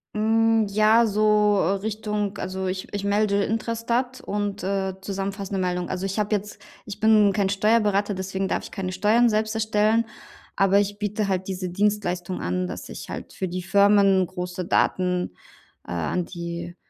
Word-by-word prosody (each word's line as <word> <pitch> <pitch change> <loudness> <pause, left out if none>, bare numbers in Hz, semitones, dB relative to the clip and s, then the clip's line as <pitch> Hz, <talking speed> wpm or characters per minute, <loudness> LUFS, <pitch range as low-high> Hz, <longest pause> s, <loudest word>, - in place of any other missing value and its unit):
Hm, 225 0 +3
ja, 215 +3 +4
so 210 -1 +3 0.2
Richtung 210 0 -3
also 190 0 -3
ich 185 0 -4
ich 200 -1 -3
melde 200 0 +2
Intrastat 230 +3 -2
und, 205 0 -3
äh, 190 0 -1
zusammenfassende 195 0 -4
Meldungen. 180 -1 -1
Also, 185 +1 -3
ich 195 +2 -2
habe 210 0 +1
jetzt 205 +1 -6 0.2
ich 205 -1 -8
bin 215 -2 +5
kein 200 -2 +1
Steuerberater, 205 0 +2
deswegen 190 0 -3
darf - - -1
ich - - -8
keine 185 -1 -4
Steuern 210 +6 +3
selbst 215 0 0
erstellen. 220 +1 +2 0.5
Aber 195 0 +3
ich 205 0 -2
biete 210 0 -1
halt 190 -1 -1
diese 185 -1 -3
Dienstleistung 185 -2 -1
an, 90 +1 -1
dass - - -7
ich - - -8
halt - - -7
für 190 - -3
die 180 +1 -4
Firmen 200 -1 +4
große 180 0 -5
Daten, 180 +1 +1 0.6
äh, - - -7
an 85 - -1
die 170 0 -6
200 Hz, 165 wpm, -24 LUFS, 185-215 Hz, 0.6 s, bin